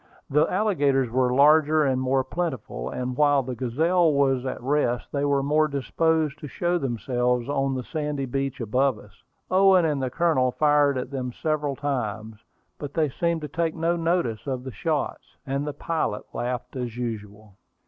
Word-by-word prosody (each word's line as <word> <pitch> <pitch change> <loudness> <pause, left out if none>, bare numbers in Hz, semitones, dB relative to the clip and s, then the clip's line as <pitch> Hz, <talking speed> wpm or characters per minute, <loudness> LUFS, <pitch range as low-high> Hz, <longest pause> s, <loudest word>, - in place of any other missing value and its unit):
The 150 +3 +3
alligators 145 - +1
were 125 0 +2
larger 150 +3 +5
and 130 -2 +1
more 130 +1 +1
plentiful, 130 - -4
and 125 0 -4
while 145 -1 +3
the 130 0 -5
Gazelle 160 +8 +2
was 135 -2 +1
at - - -4
rest 125 -2 0
they 140 -1 -1
were 140 -1 +2
more 155 +2 +3
disposed 155 +2 0
to 150 - -7
show 175 +4 -1
themselves 125 -2 -1
on 135 -1 0
the 130 - -3
sandy 150 -1 -3
beach 135 +1 -3
above 125 +2 +1
us. 105 -1 -17 0.3
Owen 190 -2 +5
and 150 -3 0
the 130 - -1
Colonel 130 -4 +1
fired 145 -2 +3
at 125 +1 -4
them 130 -2 -3
several 150 0 -2
times; 110 -6 -3 0.4
but 145 -1 -7
they 155 -3 +2
seemed 170 +4 -1
to 150 - -4
take 165 +2 -2
no 165 +1 +1
notice 165 -9 -1
of 130 -2 -3
the 130 - -6
shots, 150 +8 -3
and 140 +1 -2
the - - -1
pilot 155 -7 -2
laughed 125 +1 -4
as 120 -2 -4
usual. 105 -3 -6
140 Hz, 175 wpm, -25 LUFS, 125-155 Hz, 0.4 s, larger